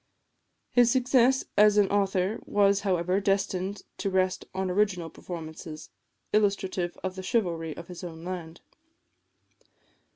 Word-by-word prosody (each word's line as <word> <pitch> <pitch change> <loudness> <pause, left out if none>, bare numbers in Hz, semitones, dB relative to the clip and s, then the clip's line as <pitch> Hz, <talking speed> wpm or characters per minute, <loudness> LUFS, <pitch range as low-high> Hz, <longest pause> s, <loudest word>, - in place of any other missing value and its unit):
His 245 -1 +5
success 255 +1 +3
as 210 0 +6
an 205 -2 +5
author 195 0 +1
was, 200 -1 +3
however, 185 -1 0
destined 195 -1 -1 0.2
to 195 - -1
rest 185 -1 0
on 190 0 -2
original 180 -4 0
performances, 160 -2 -8 0.4
illustrative 195 -4 +1
of 185 0 -3
the 190 - -5
chivalry 175 -7 -1
of 170 - -8
his 180 0 -9
own 165 -2 -8
land. 175 -2 -6
190 Hz, 125 wpm, -28 LUFS, 175-205 Hz, 0.4 s, as